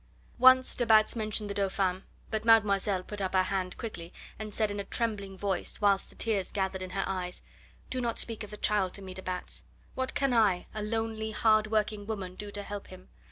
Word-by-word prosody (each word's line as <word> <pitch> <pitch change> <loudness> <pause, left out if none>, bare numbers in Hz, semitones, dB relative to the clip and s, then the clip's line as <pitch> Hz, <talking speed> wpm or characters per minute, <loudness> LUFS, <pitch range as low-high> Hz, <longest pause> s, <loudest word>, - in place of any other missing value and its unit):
Once 260 +1 +7
de 245 - 0
Batz 220 -1 +5
mentioned 215 -1 -1
the 200 - -3
Dauphin, 195 -2 0 0.3
but 220 -1 -1
mademoiselle 205 -4 +4
put 205 +2 -6
up 190 0 -1
her 185 - +5
hand 185 -1 -2
quickly 175 -7 -6 0.3
and 215 -1 -5
said 215 0 +1
in 205 - -4
a - - -2
trembling 200 -4 -2
voice, 190 -2 -1
whilst 200 -2 +2
the - - -19
tears 205 -5 -1
gathered 190 -1 -1
in 185 - -5
her 195 +1 -1
eyes: 180 -2 -4 0.5
"Do 255 - -1
not 235 -2 -1
speak 225 -2 0
of 210 - -8
the 210 - -8
child 200 -4 +1
to 200 - -5
me, 185 -1 -7
de 190 - -7
Batz. 185 -1 -4 0.3
What 260 0 -2
can 275 -2 +2
I, 205 -6 +3
a 215 - -4
lonely, 220 0 -2
hard 215 0 +3
working 215 -1 0
woman, 195 -5 -4
do 205 +2 -7
to 205 0 -4
help 205 0 -6
him? 185 0 -13
205 Hz, 215 wpm, -30 LUFS, 190-220 Hz, 0.5 s, Once